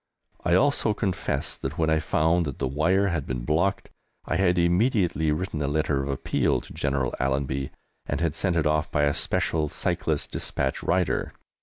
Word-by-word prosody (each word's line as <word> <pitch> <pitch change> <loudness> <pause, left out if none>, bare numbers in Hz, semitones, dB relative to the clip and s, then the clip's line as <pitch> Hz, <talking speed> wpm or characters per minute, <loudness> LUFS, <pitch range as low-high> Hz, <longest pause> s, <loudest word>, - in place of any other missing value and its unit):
I 90 0 +3
also 125 -3 +3
confessed 90 -10 -2
that, - - -4
when 80 -1 +2
I 80 - +3
found 80 +2 +1
that 70 - -5
the 65 - -1
wire 90 +9 +2
had 80 -5 -2
been 60 -2 -3
blocked, 85 +7 0 0.3
I - - 0
had 90 -2 +2
immediately 85 - +2
written 75 0 -2
a 70 - 0
letter 75 -1 0
of 70 - -4
appeal 70 - 0
to - - -13
General 70 -2 -1
Allenby, 65 0 -1 0.4
and - - -1
had 85 -3 0
sent 90 -3 0
it 85 -2 +1
off 75 0 +1
by 75 - +2
a 70 0 +3
special 75 +1 0
cyclist - - -2
despatch 65 -1 -2
rider. 90 0 0
80 Hz, 180 wpm, -26 LUFS, 70-90 Hz, 0.4 s, I